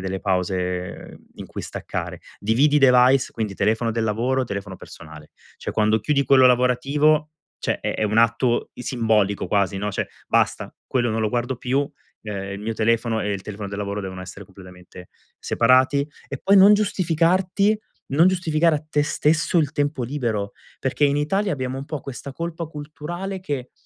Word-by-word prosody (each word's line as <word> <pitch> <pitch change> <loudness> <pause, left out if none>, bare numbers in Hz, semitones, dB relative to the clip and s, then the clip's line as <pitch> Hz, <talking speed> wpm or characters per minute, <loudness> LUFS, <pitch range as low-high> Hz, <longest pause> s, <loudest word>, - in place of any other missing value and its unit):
delle 95 0 -4
pause 90 -1 -2 0.2
in - - -8
cui - - -7
staccare. - - -5 0.2
Dividi 130 +8 +3
i - - +6
device, 130 0 +5
quindi 110 -3 -3
telefono 115 +3 +1
del 115 0 -1
lavoro, 125 +5 0
telefono 100 -4 -6
personale. 75 -3 -13 0.3
Cioè, - - -5
quando 110 +1 +2
chiudi 140 +5 +1
quello 130 -2 +5
lavorativo, 140 +5 +2 0.3
cioè - - -2
è - - -2
è - - -2
un 110 +1 +1
atto 115 +1 +2
simbolico 110 -5 0
quasi, 100 -1 0
no. 105 +1 -2
Cioè: - - -3 0.2
"Basta, - - 0
quello 120 -2 0
non 110 0 -1
lo 105 - 0
guardo 125 +1 -1
più", 135 +3 -1 0.3
ehm, 100 -2 -5
il 100 - -6
mio 110 +2 -3
telefono 115 0 +1
e 105 0 -1
il 100 - -4
telefono 105 0 -6
del 100 - -6
lavoro 100 0 -3
devono 95 -1 -6
essere 95 +2 -9
completamente 90 -1 -14 0.3
separati. 130 +4 +3 0.2
E 135 - -5
poi 200 +1 +5
non 195 +2 +8
giustificarti, 185 +1 +1 0.4
non 165 +6 +5
giustificare 165 -3 +2
a 150 - -8
te 150 -1 +1
stesso 155 +3 +1
il 150 -2 +1
tempo 145 -3 -1
libero 115 -6 -2 0.3
perché 135 +3 0
in 140 0 +2
Italia 195 +7 0
abbiamo 130 -2 -3
un 135 - -6
po' 150 -2 -5
questa 135 +2 -8
colpa 170 +2 -5
culturale 160 +5 -6
che, 140 -8 -4
125 Hz, 175 wpm, -22 LUFS, 105-150 Hz, 0.4 s, non